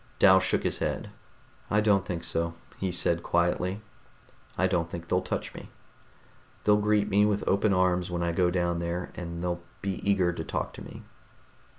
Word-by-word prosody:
Dal 95 -1 +7
shook 95 - 0
his - - -1
head. - - -2 0.6
"I 105 - +3
don't 100 -4 +3
think 85 -2 -3
so," 85 0 -1 0.2
he 95 -1 -1
said 85 -1 +1
quietly. 90 +4 0 0.8
"I - - +3
don't 85 -1 0
think 85 0 -7
they'll 90 +1 +2
touch 95 - -4
me. - - -10 0.9
They'll 105 0 +5
greet 105 0 +2
me 105 0 +3
with 105 -1 +1
open 100 +1 +3
arms 90 -1 +2
when 85 -1 -2
I 85 - +1
go 90 +1 +2
down 85 -1 0
there, 85 +1 -3
and 85 -1 -6
they'll 85 -1 -2 0.2
be 100 -1 -2
eager 95 -3 +2
to 80 - -4
talk - - -3
to - - -10
me." - - -10
90 Hz, 185 wpm, -28 LUFS, 85-100 Hz, 0.9 s, Dal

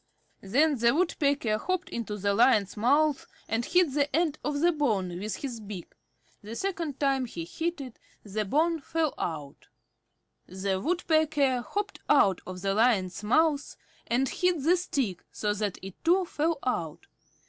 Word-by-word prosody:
Then 280 +7 +2
the 235 +3 +4
Woodpecker 285 -10 +1
hopped 370 +4 -2
into 220 -3 -4
the 200 0 0
Lion's 210 -2 +3
mouth 285 +6 +2 0.2
and 225 +1 0
hit 345 0 +2
the 285 -1 +1
end 320 -3 +1
of 295 -1 -1
the 345 +3 +4
bone 205 - -1
with 210 +2 -3
his 250 -5 -5
beak. 205 -4 -8 0.5
The 215 +2 -8
second 335 -5 -3
time 270 -2 +1
he 170 -8 -6
hit 330 - -3
it, 255 -4 -9 0.2
the 215 +1 -2
bone 320 - +1
fell 320 +1 -1
out. 150 -4 -5 0.8
The 190 +1 -2
Woodpecker 310 - +1
hopped 405 +9 -4
out 195 -10 +4
of 185 0 -7
the 195 0 +1
Lion's 210 -4 +2
mouth, 290 +6 +2 0.3
and 255 +3 +1
hit 355 0 0
the 340 +4 +5
stick 265 - -2
so 210 -1 -1
that 205 -2 -2
it 195 -1 -10
too 360 +3 +3
fell 325 0 -1
out. 170 -9 -2
260 Hz, 160 wpm, -28 LUFS, 205-315 Hz, 0.8 s, the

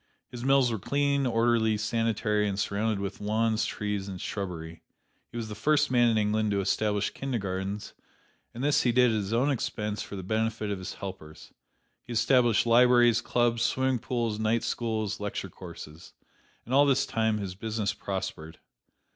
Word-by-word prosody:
His 120 -1 -7
mills 135 -2 +4
were 110 - -2
cleanly, 140 +3 +1
orderly, 115 -2 +2
sanitary, 105 -1 0
and 100 - -3
surrounded 105 +1 0
with 100 0 -5
lawns, 110 +1 +1
trees 105 -2 -3
and 95 -2 -6
shrubbery. 85 -5 -5 0.5
He - - -8
was 115 -2 -3
the 110 - -6
first 145 +7 +2
man 120 -2 +4
in 110 - +2
England 105 0 +1
to 100 -1 0
establish 105 +1 0
kindergartens, 100 -6 -4 0.6
and 120 - -6
this 145 0 +3
he 125 - +2
did 125 0 +4
at - - 0
his 100 -1 -3
own 125 +5 +2
expense 105 -4 -3
for - - -7
the 95 - -6
benefit 110 +1 -1
of 100 - -3
his 95 - -6
helpers. 95 -6 -9 0.5
He 120 - -8
established 120 0 +3
libraries, 120 0 +5
clubs, 120 -1 +1
swimming 130 -1 +1
pools, 115 -3 -2
night 110 +1 +1
schools, 110 -3 -2
lecture 105 -2 -4
courses. 85 -3 -11 0.5
And 120 - -5
all 145 +1 +6
this 140 0 +3
time 110 -4 0
his 100 -3 -4
business 110 +1 -2
prospered. 80 -5 -5
110 Hz, 170 wpm, -28 LUFS, 100-120 Hz, 0.6 s, all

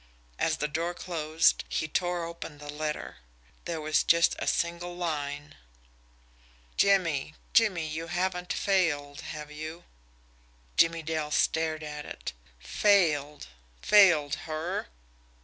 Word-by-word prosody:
As 160 -1 +1
the 150 - -1
door 165 +4 -2
closed, 160 -2 +1
he 155 - -1
tore 175 +1 -1
open 165 -2 -8
the 145 0 -8
letter. 150 - -4 0.5
There 170 -2 -3
was 155 0 +2
just 170 0 +4
a - - -3
single 170 +1 -1
line: 145 -4 -3 1.2
Jimmie 165 -7 +2 0.2
Jimmie, 195 -8 +3
you 160 +2 -4
haven't 180 +1 -2
failed, 155 -8 0
have 150 -1 -7
you? 155 +3 -7 0.9
Jimmie 165 -1 +3
Dale 155 -1 -2
stared 160 +1 +1
at 150 -1 -6
it. - - -6 0.2
Failed! 150 - +2 0.4
Failed 170 -9 +6 0.2
HER! 160 +4 -3
160 Hz, 115 wpm, -28 LUFS, 150-175 Hz, 1.2 s, Failed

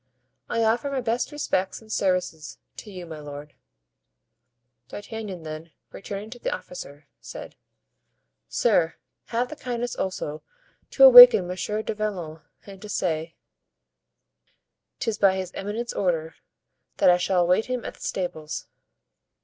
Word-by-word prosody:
"I 230 - 0
offer 230 +5 +1
my 275 -2 -2
best 235 +3 -1
respects 195 -10 -2
and 220 -1 -15
services 180 -6 -1 0.2
to 215 - -10
you, 185 -3 -8
my 160 -2 -9
lord." 145 0 -9 1.4
D'Artagnan 205 -4 -7
then, 155 +1 -8 0.2
returning 205 +2 -7
to 245 - -9
the - - -2
officer, 145 -4 -8
said: - - -10 0.9
"Sir, 175 -8 +2 0.3
have 240 +2 -2
the - - -7
kindness 245 -3 -4
also 155 -5 -4 0.5
to - - +3
awaken - - +11
Monsieur 210 +4 -3
du - - -3
Vallon 185 -7 -4 0.2
and 195 -1 -12
to 210 - -9
say 165 -4 -2 1.6
'tis 225 -5 -2
by 195 -1 +4
his 185 -1 -4
eminence's 215 +4 -4
order, 165 -4 0
and 160 - -26 0.6
that - - +6
I 175 - +4
shall 180 0 +1
await 180 +5 +2
him 250 -2 -3
at - - -5
the - - -21
stables." 155 -4 -4
190 Hz, 140 wpm, -25 LUFS, 165-225 Hz, 1.6 s, awaken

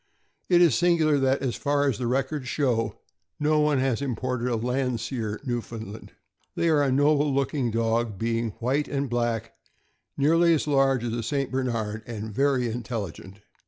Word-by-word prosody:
It 175 -1 +5
is 165 -7 +5
singular 160 0 +3
that, 135 0 +1
as 125 -3 -1
far 145 0 +1
as 125 -7 -1
the 120 - -1
records 135 +2 -1
show, 120 -6 0 0.4
no 150 +1 +2
one 150 -1 +3
has 130 -1 0
im 135 -4 -2
ported 125 +1 -2
a 120 - 0
Landseer 115 -2 -2
Newfoundland. 115 -3 -5 0.4
They 170 - +1
are 155 -2 +4
a 140 -2 +2
noble 145 +2 +3
look 135 +1 0
ing 135 -5 0
dog, 115 -1 0
being 115 +2 -1
white 130 +6 0
and 140 0 -2
black, 120 -2 -1 0.6
nearly 165 +4 +4
as 150 - -1
large 135 -4 +2
as 120 -1 -2
a 120 - -2
St. 135 +4 -2
Bernard, 115 -5 -2
and 110 -2 -6
very 135 0 +2
intelligent. 105 -4 -6
130 Hz, 170 wpm, -26 LUFS, 115-140 Hz, 0.6 s, It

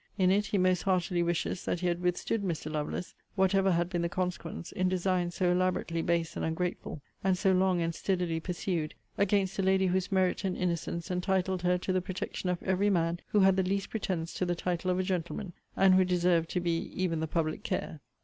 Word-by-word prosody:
In 185 -1 +4
it, 205 +2 +2
he 205 - 0
most 185 -2 +3
heartily 180 -2 +1
wishes 170 +1 -1
that 175 - -1
he 180 - +1
had 175 0 0
withstood 180 +5 0
Mr. 165 -5 -3
Lovelace, 155 +3 -3 0.2
whatever 190 0 +3
had 170 0 +1
been 175 -1 -2
the 170 - 0
consequence, 180 -2 -4
in 185 0 0
designs 180 -1 0
so 180 -2 +2
elaborately 180 -2 0
base 170 -1 0
and - - -3
ungrateful, 160 -2 -3 0.2
and 190 -1 +2
so 190 +1 +3
long 185 -2 +3
and 165 0 -1
steadily 175 -3 -1
pursued, 175 -2 -3 0.2
against 195 -1 +1
a - - +4
lady 190 0 +3
whose 185 +1 0
merit 190 +1 +1
and 190 -2 -1
innocence 170 -1 -2
entitled 185 0 0
her 180 0 +2
to 185 +1 -2
the 185 - +2
protection 185 0 -4
of 180 -1 -2
every 190 +2 +2
man 170 -2 +1
who 210 - +3
had 190 0 +5
the - - +4
least 195 +1 -1
pretences 180 -6 -2
to - - +1
the 175 -1 0
title 175 +1 -2
of 180 - +2
a 185 - +1
gentleman; 185 +1 -3 0.2
and 190 -1 +5
who 185 0 +6
deserved 175 -2 +2
to 180 - -1
be 170 -1 -1
even 170 -3 0
the 160 - -1
public 155 0 -1
care. 155 - -3
180 Hz, 215 wpm, -30 LUFS, 170-190 Hz, 0.2 s, who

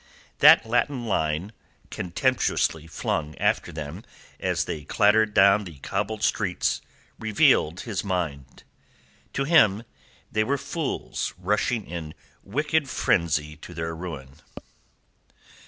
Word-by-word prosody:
That - - +8
Latin 120 +2 0
line, 80 -1 -1 0.4
contemptuously 90 - 0
flung 75 -1 -3
after - - 0
them 75 -2 -7 0.4
as - - 0
they 75 - -5
clattered 105 +6 +3
down 100 +2 +6
the 85 -6 -10
cobbled 110 +9 -3
street, 95 -5 0 0.4
reveals 100 -6 +3
his 110 -6 -3
mind. 85 -9 -4 0.7
To 135 - 0
him 115 - +4 0.5
they 110 - +2
were 140 +5 0
fools 160 0 -4
rushing 105 +4 0
in 80 -3 -7 0.3
wicked 150 +6 -1
frenzy 80 -9 +1
upon 85 +3 -12
their 80 0 -3
ruin. 75 -6 -8
95 Hz, 110 wpm, -25 LUFS, 80-110 Hz, 0.7 s, That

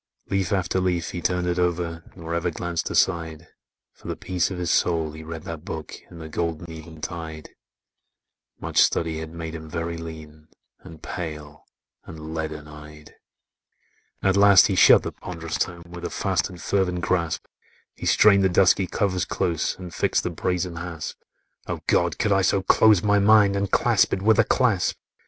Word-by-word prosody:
Leaf 95 -3 0
after 95 -1 0
leaf 90 -2 -1
he 85 - -5
turned 90 0 0
it 90 0 -1
o'er 85 -2 -1
Nor 85 -2 -6
ever 85 +1 0
glanced 85 0 -3
aside, 85 -3 0 0.5
For - - -14
the - - -3
peace 90 -1 -1
of 95 - -5
his 90 0 -1
soul 80 -3 +1
he 80 +1 -10
read 80 0 -7
that 80 -2 -7
book 80 -3 -6
In - - -12
the 80 -1 -8
golden 85 +1 -3
eventide: 80 -1 -8 1.1
Much - - +1
study 80 -1 +1
had 80 0 -7
made 80 -1 -6
him 80 -1 -8
very 85 0 -4
lean, 80 -2 -10 0.3
And 80 -2 -14
pale, 75 -3 -7 0.4
and 80 -1 -9
leaden 80 -2 -5
eyed. 75 0 -13 1.1
At 95 0 +3
last 100 -1 +7
he 100 - 0
shut - - +7
the - - -4
pond'rous 85 -3 -6
tome, 85 -1 -2
With 85 0 -9
a 85 - -3
fast 95 -5 -1
and 90 -2 -11
fervent 90 -1 0
grasp 85 -3 -1 0.5
He - - -6
strained 100 -2 +5
the 95 - +4
dusky 90 +1 +3
covers 95 -2 0
close, 85 -3 -1
And 90 -2 -9
fixed - - 0
the 90 - -2
brazen 90 0 -2
hasp; 85 -2 -6 0.5
"Oh, - - -3
God! - - +1
could 110 - 0
I 95 0 +4
so 95 0 +1
close 105 0 +5
my 105 0 +3
mind, 100 -1 +5
And 100 0 -1
clasp - - +3
it 95 - -2
with 110 +1 +4
a - - +7
clasp!" 110 -9 +1
85 Hz, 180 wpm, -24 LUFS, 80-95 Hz, 1.1 s, last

